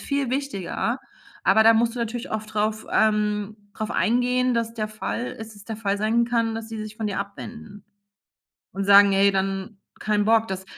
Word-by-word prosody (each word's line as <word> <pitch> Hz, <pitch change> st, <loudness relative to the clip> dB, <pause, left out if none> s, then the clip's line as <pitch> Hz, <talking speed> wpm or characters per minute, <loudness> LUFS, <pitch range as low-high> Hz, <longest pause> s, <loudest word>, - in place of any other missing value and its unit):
viel 280 Hz, -3 st, -2 dB
wichtiger.“ 265 Hz, -9 st, -2 dB, 0.4 s
Aber 220 Hz, +3 st, +5 dB
da 225 Hz, +1 st, +7 dB
musst 230 Hz, +1 st, +2 dB
du -, -, -6 dB
natürlich 235 Hz, +2 st, -4 dB
oft 215 Hz, 0 st, -5 dB
drauf 215 Hz, +1 st, -1 dB
ähm, 210 Hz, -1 st, +1 dB, 0.2 s
drauf 215 Hz, +2 st, -4 dB
eingehen, 250 Hz, +2 st, +1 dB
dass 230 Hz, 0 st, -1 dB
der 215 Hz, -2 st, -2 dB
Fall 215 Hz, +3 st, -4 dB
ist 220 Hz, -2 st, -8 dB
es 200 Hz, -, -14 dB
der 225 Hz, -, -6 dB
Fall 200 Hz, -2 st, -1 dB
sein 220 Hz, +3 st, +2 dB
kann, 230 Hz, -1 st, 0 dB
dass 225 Hz, 0 st, -6 dB
die 225 Hz, -1 st, -6 dB
sich 215 Hz, 0 st, -7 dB
von 220 Hz, -, -3 dB
dir 200 Hz, -2 st, -2 dB
abwenden 205 Hz, 0 st, -8 dB, 0.9 s
und 195 Hz, +1 st, -3 dB
sagen: 200 Hz, 0 st, +7 dB
„Ey, 200 Hz, +1 st, +4 dB
dann 195 Hz, +2 st, -2 dB, 0.2 s
kein 210 Hz, -1 st, 0 dB
Bock, 225 Hz, 0 st, +3 dB
das“ 190 Hz, 0 st, -5 dB
220 Hz, 190 wpm, -24 LUFS, 205-230 Hz, 0.9 s, da